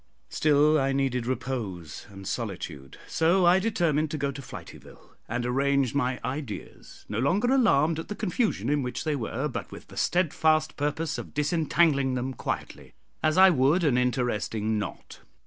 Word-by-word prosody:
Still 150 0 +3
I 135 0 +1
needed 130 -3 0
repose 115 - -4
and 95 -1 -10
solitude, 90 - -5
so 175 +3 +3
I 175 +2 +6
determined 170 -8 +1
to 155 - -3
go 140 -1 -1
to 140 - -8
Flityville 130 - -12 0.2
and 120 +2 -2
arrange 135 0 +1
my 130 -2 0
ideas, 130 -3 -7
no 105 - -3
longer 200 - +2
alarmed 165 - +3
at 160 - -6
the 210 - -5
confusion 200 - -1
in 145 +1 +2
which 125 -1 -4
they 155 -2 0
were, 120 -5 -2
but - - -6
with - - -11
the - - -12
steadfast 155 -3 +2
purpose 150 +2 -2
of - - -9
disentangling 150 -3 +2
them 130 +1 -2
quietly, - - -5 0.3
as 155 +2 +1
I 190 0 +8
would 150 +4 +3
an 145 -6 +3
interesting 115 -3 0
knot. 100 - -7
140 Hz, 165 wpm, -27 LUFS, 125-160 Hz, 0.3 s, I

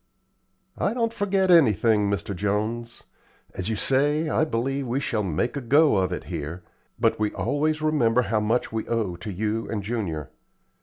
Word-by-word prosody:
"I - - 0
don't 230 -2 0
forget 195 -4 +1
anything, 110 - +4
Mr. 100 0 -2
Jones. 110 +5 -2 0.5
As 95 +3 -3
you 110 - 0
say, 145 +7 +2
I 155 - +2
believe 135 0 -2
we 125 +3 0
shall 115 -6 -1
'make 95 - -1
a 140 - -3
go' 140 0 +4
of 95 -1 +1
it - - -4
here, 85 +5 -6 0.4
but - - +2
we 105 -1 0
always 155 +1 -1
remember 125 -6 +2
how 110 0 0
much 110 +4 0
we 110 -1 -3
owe 110 -7 -1
to 95 +5 -6
you 110 +4 -2
and 105 -3 -3
Junior. 95 - -3
115 Hz, 170 wpm, -25 LUFS, 105-145 Hz, 0.5 s, anything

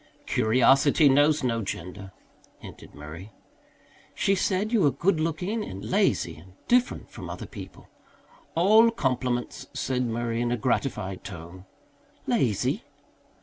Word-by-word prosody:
"Curiosity 135 +6 +4
knows 145 +2 +4
no 115 -2 0
gender," 95 0 -6 0.5
hinted - - -13
Murray. 80 +7 -10 0.8
"She 195 - +2
said 195 +2 0
you 225 - +4
were 145 - +5
good 170 +4 +1
looking 180 +7 -2
and 95 - -7
lazy - - +1
and 90 +4 -16
different 245 +1 +1
from - - -8
other - - -6
people." - - -11 0.7
"All 215 +7 +6
compliments," 125 - -2
said 130 -1 -1
Murray 115 0 -2
in 120 0 0
a 120 - 0
gratified 110 -5 -2
tone. 90 +1 -10 0.6
"Lazy?" - - 0
125 Hz, 125 wpm, -26 LUFS, 105-165 Hz, 0.8 s, All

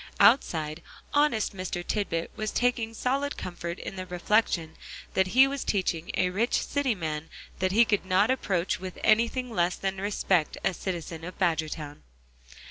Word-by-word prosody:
Outside, 155 - +4 0.3
honest 290 -9 +2
Mr. 185 -1 -4
Tisbett 170 -6 -1
was 215 -1 -2
taking 235 -2 0
solid 275 +4 -1
comfort 175 -1 -5
in 195 - -7
the 185 0 -5
reflection 180 -3 +1 0.4
that 190 0 +3
he 255 +8 +6
was 275 0 -2
teaching 175 -4 -1
a 180 - +2
rich 220 +6 +1
city 280 -5 0
man 160 -3 -4 0.3
that 185 0 +1
he 230 +4 +6
could 210 -3 +1
not 190 +5 +3
approach 190 -10 0
with 185 0 -7
anything 235 +3 +2
less 175 -4 +1
than 195 0 -3
respect 190 -5 +1
a - - +2
citizen 170 -3 -5
of 180 +2 -7
Badgertown. 155 -4 -1
190 Hz, 155 wpm, -28 LUFS, 170-225 Hz, 0.4 s, he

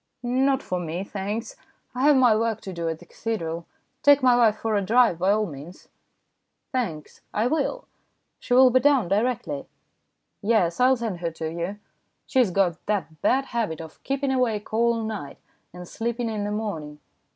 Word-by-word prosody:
" - - -53
Not 265 +2 +1
for 180 - -2
me, 175 +2 -4
thanks. 205 +3 -4 0.4
I 250 - -3
have 295 -1 +6
my 250 -4 +5
work 225 -1 0
to 190 - -7
do 170 -1 -2
at 160 - -3
the - - -16
cathedral. 170 -7 -4 0.3
Take 285 -1 +5
my 250 -1 +6
wife 230 -3 +4
for 220 -1 -1
a 200 - +2
drive, 225 -3 +3
by 185 +2 +2
all 215 +1 +3
means." 155 +1 -10 0.4
" - - -53
Thanks, 180 -13 -3
I 215 - +2
will. 315 - -1 0.5
She 245 - 0
will 255 0 +7
be 255 - +5
down 265 -8 +3
directly? 200 - -1 0.4
" - - -51 0.3
"Yes; 200 -6 +1
I'll 255 +1 +5
send 225 -7 -4
her 170 -1 -2
to 160 -1 -4
you. 170 +4 -4 0.5
She 260 - +1
has 245 -6 +4
got 180 -3 0
the 205 -4 0 0.2
bad 270 +1 +2
habit 225 - -2
of 160 -1 -11
keeping 275 0 -1
awake 230 -6 -1
all 230 0 +2
night, 205 -11 -5 0.3
and 180 0 -10
sleeping 235 +3 -3
in 210 -2 -3
the 205 - -2
morning. 165 -9 -4
215 Hz, 190 wpm, -25 LUFS, 175-250 Hz, 0.5 s, will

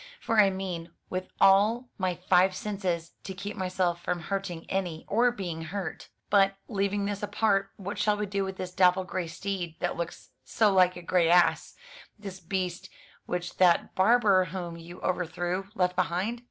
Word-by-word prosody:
For 225 -1 +1
I 200 -2 +7
mean, 185 -3 -5 0.2
with 185 0 -3
all 215 +6 +4
my 185 -2 0
five 180 +1 +3
senses, 180 -6 -3
to 190 - -6
keep 200 +2 -6
myself 185 -2 -1
from 175 0 -2
hurting 180 -1 -4
any, 180 -4 -3
or 235 +4 +3
being 175 -8 -5
hurt. 180 -1 -5 0.2
But, 195 -1 +4
leaving 200 -1 -1
this 200 -1 -3
apart, 205 -1 +1
what 200 +1 -6
shall 210 -1 +2
we 210 - -1
do 200 0 -1
with 190 0 -5
this 185 -1 -5
dapple 185 0 +4
grey 185 -2 -4
steed, 175 -1 -4
that - - -2
looks 170 0 -6
so 215 -3 +2
like 185 -1 +4
a 175 - -9
grey 170 -1 +2
ass? 175 0 +3 0.4
This 195 -3 -8
beast 185 +1 -3 0.4
which 180 0 -4
that 180 -2 +4
barber 200 -2 +4
whom 175 -1 -5
you 170 +1 -11
overthrew 180 +1 -2
left 180 -3 +1
behind? 185 +6 -1
185 Hz, 170 wpm, -28 LUFS, 175-200 Hz, 0.4 s, I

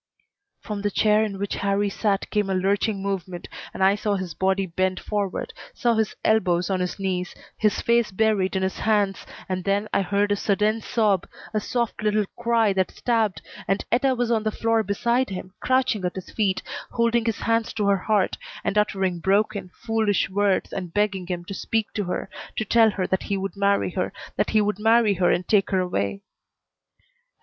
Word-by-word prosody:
From 210 -2 -5
the 205 - 0
chair 210 +1 +3
in 205 -3 -3
which 200 +1 -3
Harrie 200 0 0
sat 200 -1 0
came 210 -2 +1
a 190 - +1
lurching 195 +2 0
movement, 185 -3 -4 0.2
and - - -2
I 190 +1 +6
saw 205 0 -1
his 185 -4 -4
body 190 +2 +1
bend 185 +1 -1
forward, 205 -3 -3 0.2
saw 240 -3 +2
his 220 -1 0
elbows 185 -4 +2
on 190 - +1
his 180 0 -2
knees, 185 -2 -2 0.2
his 215 -1 +1
face 235 -1 +2
buried 200 -1 +1
in 190 - 0
his 190 - -2
hands, 205 -3 +1 0.2
and 185 -1 -2
then 200 +2 0
I - - +3
heard 200 +2 +1
a - - +4
sudden 210 +2 +1
sob, 210 -5 +1 0.3
a 215 - +2
soft, 235 +1 -2
little 210 -1 +2
cry 230 -3 +2
that 190 -2 +1
stabbed, 220 -8 0 0.2
and 195 - 0
Etta 260 +2 +3
was 240 -1 0
on 225 -2 +2
the 215 - 0
floor 225 +1 +1
beside 235 +5 0
him, 185 -1 -6
crouching 255 -6 +1
at 180 - -2
his 190 - -7
feet, 200 -4 0 0.3
holding 235 0 +1
his 225 -3 -1
hands 230 0 +1
to 215 -2 -1
her 200 0 +4
heart, 200 0 0 0.2
and 210 - +1
uttering 190 -4 0
broken, 200 +1 +1
foolish 220 -3 0
words 200 0 +1
and 180 -3 -5
begging 205 -3 0
him 175 -1 -4
to 195 - -6
speak 220 +2 -2
to 205 - -2
her, 180 - -3 0.3
to 220 - 0
tell 225 +1 +5
her 195 -3 -2
that 190 - 0
he 200 - -2
would 195 +1 -4
marry 200 -1 +2
her 185 0 -2 0.2
that - - 0
he 215 - +3
would 210 0 -1
marry 225 -1 +4
her 180 -1 +2
and 180 - +1
take 205 -3 +3
her 190 - +2
away. 180 - -1
200 Hz, 195 wpm, -24 LUFS, 190-220 Hz, 0.3 s, I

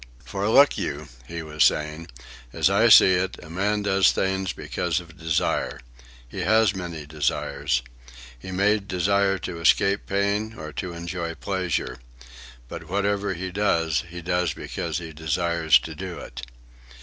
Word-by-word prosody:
"For 100 +1 -2
look 140 +5 +5
you," - - -4 0.2
he 85 -1 -6
was 75 -1 +1
saying, 75 +2 +1 0.4
"as 95 - +2
I 110 +4 +4
see 95 -3 +8
it, 95 +1 -1
a 80 - -12
man 105 +4 0
does 95 -3 +4
things 95 -1 -1
because - - -2
of 85 -2 -13
desire. 80 0 -1 0.5
He 80 - -8
has 105 +2 +3
many 85 -5 -6
desires. 70 -4 -1 0.6
He 95 - -9
may 100 +3 +2
desire 100 0 +1
to 85 -1 -6
escape 100 +4 +3
pain, 100 +3 -1
or 75 -1 -8
to 90 +2 -4
enjoy 85 0 -5
pleasure. 95 -8 -2 0.7
But 80 +6 -9
whatever 100 0 0
he 90 +2 -5
does, 80 -8 +1
he 90 0 -8
does 90 0 0
because - - -4
he 85 -2 -7
desires 80 0 +2
to - - -7
do - - -6
it." - - -9
90 Hz, 150 wpm, -24 LUFS, 80-100 Hz, 0.7 s, see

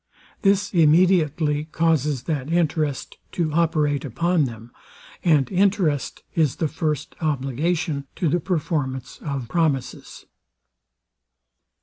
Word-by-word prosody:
This 200 0 +2
immediately 155 -3 +3
causes 155 -5 0
that 150 -2 -3
interest 155 -4 -1
to 160 -4 -1
operate 155 -4 +1
upon 165 +4 +1
them; 115 -1 -8 0.5
and 150 -6 +3
interest 185 -7 +1
is 155 -5 +1
the 160 - -1
first 150 -2 -3
obligation 150 +1 -1
to 175 - 0
the 175 +4 +2
performance 145 -7 -2
of 135 -5 -4
promises. 145 -2 -2
155 Hz, 100 wpm, -23 LUFS, 140-170 Hz, 0.5 s, immediately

